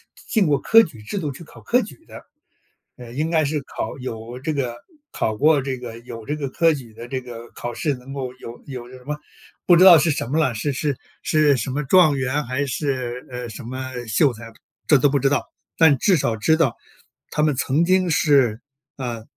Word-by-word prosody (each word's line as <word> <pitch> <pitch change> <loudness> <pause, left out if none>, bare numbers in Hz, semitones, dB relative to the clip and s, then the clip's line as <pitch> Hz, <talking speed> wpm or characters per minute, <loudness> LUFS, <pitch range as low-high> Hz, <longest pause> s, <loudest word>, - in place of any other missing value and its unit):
进 215 -7 0
过 145 -2 +2
科 225 +9 +6
举 155 - -5
制 200 - -4
度 150 -5 -3
去 150 +6 -10
考 - - -15
科 250 +1 +2
举 220 +10 -10
的， - - -12 0.7
呃， 120 -2 -11
应 155 +5 -1
该 160 -2 +2
是 150 +1 -1
考 - - -5
有 120 0 -7
这 155 +4 -2
个 125 -4 -2 0.3
考 110 - -1
过 150 +5 +4
这 130 -1 -3
个 115 -2 -8
有 115 -2 -10
这 145 - -2
个 145 -2 -3
科 165 +3 +3
举 125 -6 -9
的 115 - -9
这 130 +1 -3
个 120 -2 -10
考 120 0 -6
试 145 +2 -1
能 125 +2 -11
够 130 -3 -4
有 120 -2 -10
有 125 -3 -7
什 130 0 -13
么， 150 +3 -4 0.5
不 175 - +6
知 175 - +6
道 185 -3 +10
是 160 +2 +2
什 140 - -1
么 155 +4 +1
了， 135 -6 +2
是 145 +7 -1
是 140 0 -2 0.2
是 150 -3 +3
什 115 - -3
么 145 +3 -2
状 155 +1 +5
元 135 +2 -1
还 130 +4 -1
是， 130 -3 -3
呃， 125 -2 -6
什 115 +5 -9
么 130 +2 -6 0.2
秀 125 +6 +3
才， 115 0 -11 0.3
这 150 - +6
都 140 +2 +3
不 140 0 +1
知 135 - +2
道， 145 - -1 0.3
但 160 -4 +5
至 190 +9 +3
少 120 -8 0
知 160 +9 +3
道 150 -8 +1 0.5
他 150 - 0
们 150 -3 +2
曾 135 +5 +1
经 185 +1 +3
是， 135 -8 +3 0.4
啊 120 -4 -5
135 Hz, 235 characters per minute, -22 LUFS, 125-155 Hz, 0.7 s, 道